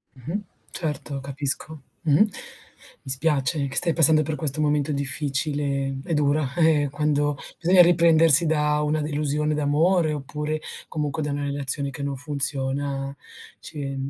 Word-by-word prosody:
Mh-mh. 160 - -5 0.3
Certo, 145 -3 -4
capisco. 140 +2 -3 0.2
Mh-mh. 160 +8 +4 0.8
Mi - - -10
spiace 140 0 +1
che 135 - -7
stai 170 -2 +2
passando 155 -1 +5
per 155 +1 -3
questo 150 0 -3
momento 150 0 +1
difficile. 140 -1 -2
È 170 - -3
dura, 145 -2 +1
eh, 155 -4 +3
quando 145 -1 0 0.2
bisogna 180 +1 +5
riprendersi 170 -2 +5
da 150 -1 +1
una 150 +1 0
delusione 150 0 -1
d'amore, 155 +3 +2
oppure, 150 +2 -4 0.3
comunque 150 0 -3
da 150 - -2
una 145 0 -3
relazione 140 0 -2
che 140 +1 -6
non 140 -1 -2
funziona, 140 -1 -3 0.4
ci 140 -2 -6
150 Hz, 135 wpm, -24 LUFS, 140-155 Hz, 0.8 s, passando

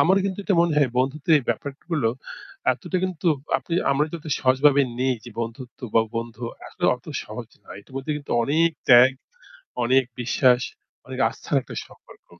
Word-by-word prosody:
আমার 190 +3 +5
কিন্তু 195 -1 -2
এটা 200 - +2
মনে 170 -2 +2
হয় 135 -4 +3
বন্ধুত্বের 145 +3 +2
ব্যাপারগুলো 140 +2 -2 0.6
এতটা 185 - -4
কিন্তু 185 -2 -4 0.3
আপনি 165 - -5 0.2
আমরা 145 +2 +2
যত 165 - -7 0.2
সহজভাবে 135 +2 +4 0.2
নেই 130 0 +2
যে 120 - -9
বন্ধুত্ব 115 +2 -7
বা 115 - +6
বন্ধু 115 0 -5 0.2
আসলে - - -6
অত - - -16 0.2
সহজ - - -8
না। - - -28
এটার 130 - -19
মধ্যে 135 +3 -2
কিন্তু 145 -1 -10
অনেক 160 +7 +3 0.2
ত্যাগ, 125 +1 +8 0.7
অনেক 130 +2 +4 0.2
বিশ্বাস, 125 +1 +3 0.5
অনেক - - -7
আস্থার - - -3
একটা - - -10
সম্পর্ক। - - -19
135 Hz, 160 wpm, -24 LUFS, 125-155 Hz, 0.7 s, ত্যাগ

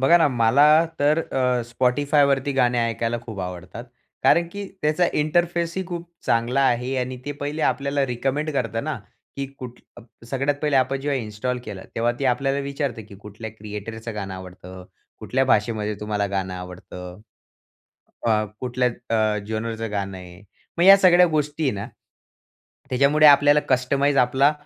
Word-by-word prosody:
बघा 135 +6 +6
ना, 160 - +4
मला 125 +3 +4 0.3
तर 150 +3 +3
अ, 125 -2 +1
Spotifyवरती 140 +2 +2
गाणे 125 -2 +2
ऐकायला 115 +1 -2
खूप 110 -5 -7
आवडतात. 90 +5 -7 0.4
कारण 170 0 +4
की 200 0 -5 0.2
त्याचा 155 +4 +2
इंटरफेस 170 +2 0
ही 190 - -2
खूप 175 -1 -6 0.2
चांगला 120 +3 +1
आहे 125 +2 0
आणि 125 0 -2
ते 145 - -3
पहिले 150 +2 -3
आपल्याला 140 0 +1
रिकमेंड 135 +5 -2
करतं 115 -3 -2
ना, 155 -3 -3 0.4
की 140 -1 -3
कुठ 125 -1 -9 0.5
सगळ्यात 140 +2 0
पहिले 150 -2 +2
आपण 135 +1 +1
जेव्हा 140 -1 -1
इन्स्टॉल 115 +3 -3
केला, 95 -2 -7
तेव्हा 120 +1 +1
ती 140 - -3
आपल्याला 135 +2 +1
विचारते, 140 -4 -3
की 105 0 -14
कुठल्या 105 +2 -8
क्रिएटरचं 110 +1 -7
गाणं 100 -2 -5
आवडतं? 90 0 -10 0.3
कुठल्या 135 +1 0
भाषेमध्ये 105 -3 +1
तुम्हाला 105 -1 -1
गाणं 95 -2 -3
आवडतं. 90 0 -9 1.1
अ, 110 -2 +2 0.2
कुठल्या 125 0 0 0.3
अ, 110 -1 +1
जेनरचं 110 0 -4
गाणं 100 -2 -3
आहे. 90 +1 -13 0.4
मग - - +3
या 195 +1 +10
सगळ्या 180 -1 +6
गोष्टी 155 -1 -1
आहे 135 - +2
ना, 100 0 -5 1.0
त्याच्यामुळे 140 +4 +4
आपल्याला 145 0 +6
कस्टमाइज 140 +2 +1
आपला 130 +4 +4
125 Hz, 155 wpm, -23 LUFS, 110-145 Hz, 1.1 s, या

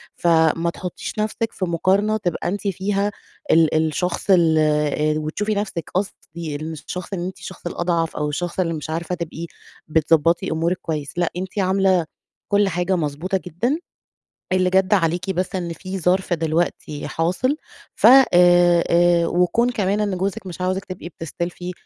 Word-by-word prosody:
فما 165 0 +3
تحُطّيش 180 -1 -6
نَفْسِك 220 +1 -1
في 185 - -2
مقارنة 190 +5 +1
تبقى 175 -5 -2
أنتِ 200 +3 -2
فيها 200 +2 0 0.4
ال 160 -1 +4
الشخص 160 +4 -1
ال 165 -4 +5
آآ 150 0 +2
وتشوفي 205 +8 -2
نَفْسِك 190 -5 -3
قصدي 170 -5 -4
الشخص 160 +5 -6
إن 175 -2 -2
أنتِ 185 - -6
الشخص 185 - -10
الأضعف 170 -1 -1
أو 150 0 -1
الشخص 175 +5 -3
اللي 165 -2 +1
مش 155 -1 -6
عارفة 165 +2 -2
تبقي 170 -1 -5 0.4
بتضبّطي 165 +3 +2
أمورِك 165 +3 0
كويس. 150 -3 -4
لأ، 175 -1 +1
أنتِ 190 +2 -4
عاملة 190 -2 +2 0.4
كل 205 0 +3
حاجة 180 +2 0
مضبوطة 165 +4 -1
جدًا، 215 - -1 0.7
اللي 185 0 +3
جَد 190 +2 +3
عليكِ 175 0 +1
بس 185 +1 -2
إن 175 -2 -3
في 190 +2 -6
ظرف 180 +1 +1
دلوقتي 160 -2 -2
حاصل 185 - 0 0.4
ف - - +1
آآ، 265 +1 +9
آآ 175 -1 +5
وكون 180 +9 +2
كمان 205 -2 0
إن 200 -3 -1
جوزِك 195 +2 -3
مش 180 +1 -7
عاوزِك 185 +1 -1
تبقي 185 -2 -7
بتستلفي، 175 +2 -5
175 Hz, 155 wpm, -21 LUFS, 165-190 Hz, 0.7 s, آآ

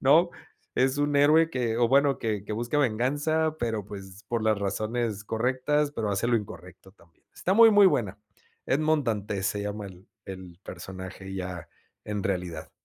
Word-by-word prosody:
¿no? 160 +6 +5 0.4
Es 130 +2 +2
un 145 0 +1
héroe 155 +3 +5
que 120 -6 -1
o 120 0 +3
bueno 140 +2 +3
que 105 -3 -2
que 105 - -5
busca 120 +6 -1
venganza 145 +6 +1
pero 110 -4 -2
pues 100 0 -10
por 115 -2 -1
las 110 -2 +2
razones 110 +2 -2
correctas 130 +6 0
pero 110 -6 -2
hace 100 +3 0
lo 120 -1 +3
incorrecto 95 -2 -11
también. 85 -5 -26
Está 185 - -1
muy, 230 +1 +8
muy 205 -1 +6
buena. 105 - +1 0.5
Edmond 155 +1 +2
Dantès 105 -3 -2
se 100 +1 -1
llama 105 0 -4
el 95 +2 -14 0.2
el 95 -2 -9
personaje 95 +1 -8
ya 90 -3 -5 0.4
en 105 -1 -3
realidad. 90 -5 -3
110 Hz, 170 wpm, -27 LUFS, 95-140 Hz, 0.5 s, muy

